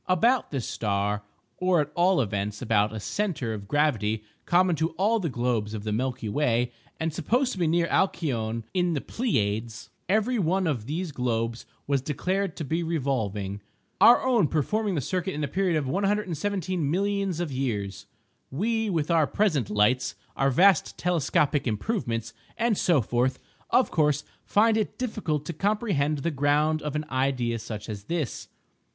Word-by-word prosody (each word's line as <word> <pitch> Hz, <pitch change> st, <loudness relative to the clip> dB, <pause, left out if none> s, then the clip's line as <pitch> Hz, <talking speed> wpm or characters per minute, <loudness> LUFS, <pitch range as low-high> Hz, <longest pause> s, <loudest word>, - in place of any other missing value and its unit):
About 230 Hz, +8 st, +3 dB
this 135 Hz, -5 st, -3 dB
star, 100 Hz, -1 st, -1 dB, 0.4 s
or 180 Hz, -2 st, +3 dB
at 150 Hz, 0 st, -1 dB
all 180 Hz, 0 st, +3 dB
events 105 Hz, -1 st, -2 dB
about 110 Hz, -3 st, +2 dB
a 110 Hz, -, -5 dB
centre 150 Hz, -, -2 dB
of 100 Hz, -2 st, -7 dB
gravity 110 Hz, -7 st, +1 dB, 0.2 s
common 180 Hz, 0 st, +4 dB
to 160 Hz, +2 st, +1 dB
all 205 Hz, +7 st, +2 dB
the 170 Hz, -5 st, -1 dB
globes 120 Hz, -4 st, -1 dB
of 105 Hz, -, -5 dB
the 110 Hz, -, -2 dB
Milky 125 Hz, +1 st, -2 dB
Way 120 Hz, 0 st, +1 dB, 0.3 s
and 160 Hz, -1 st, -1 dB
supposed 245 Hz, -, +1 dB
to 190 Hz, -, -6 dB
be 170 Hz, -, +2 dB
near 170 Hz, +1 st, +2 dB
Alcyone 115 Hz, -, 0 dB
in 180 Hz, -2 st, +1 dB
the -, -, 0 dB
Pleiades, 110 Hz, -, -2 dB, 0.2 s
every 220 Hz, +4 st, +2 dB
one 185 Hz, +1 st, +1 dB
of 125 Hz, -9 st, -1 dB
these 165 Hz, +3 st, -3 dB
globes 115 Hz, -3 st, -2 dB, 0.2 s
was 140 Hz, -2 st, +1 dB
declared 180 Hz, +6 st, -1 dB
to -, -, -3 dB
be 165 Hz, +5 st, -1 dB
revolving, 110 Hz, -, -2 dB, 0.4 s
our 240 Hz, -, +8 dB
own 240 Hz, -10 st, +3 dB
performing 200 Hz, +7 st, 0 dB
the 145 Hz, -, 0 dB
circuit 185 Hz, +6 st, -2 dB
in 150 Hz, -, -2 dB
a -, -, 0 dB
period 180 Hz, +2 st, +1 dB
of 150 Hz, -, -1 dB
117,000,000 195 Hz, 0 st, -1 dB
of 175 Hz, -4 st, -2 dB
years! 110 Hz, -7 st, -3 dB, 0.4 s
We, 220 Hz, -, 0 dB
with 165 Hz, -3 st, 0 dB
our 160 Hz, -3 st, +4 dB
present 155 Hz, -, +1 dB
lights, 105 Hz, +5 st, +2 dB, 0.2 s
our 135 Hz, -, +2 dB
vast 185 Hz, +7 st, +4 dB
telescopic 155 Hz, -4 st, +1 dB
improvements, 115 Hz, -, -2 dB, 0.2 s
and 230 Hz, -1 st, +2 dB
so 170 Hz, -7 st, +3 dB
forth, 125 Hz, +4 st, 0 dB, 0.3 s
of 255 Hz, -, +3 dB
course 150 Hz, -2 st, +2 dB, 0.2 s
find 220 Hz, +1 st, +3 dB
it 215 Hz, -, -2 dB
difficult 185 Hz, -, -2 dB
to 170 Hz, -, -4 dB
comprehend 190 Hz, -6 st, 0 dB
the 170 Hz, -, 0 dB
ground 150 Hz, +2 st, +2 dB
of 150 Hz, -1 st, -4 dB
an 150 Hz, 0 st, -1 dB
idea 130 Hz, -3 st, 0 dB
such 110 Hz, -2 st, -7 dB
as 105 Hz, -3 st, -6 dB
this. 165 Hz, -7 st, -3 dB
150 Hz, 165 wpm, -26 LUFS, 120-185 Hz, 0.4 s, our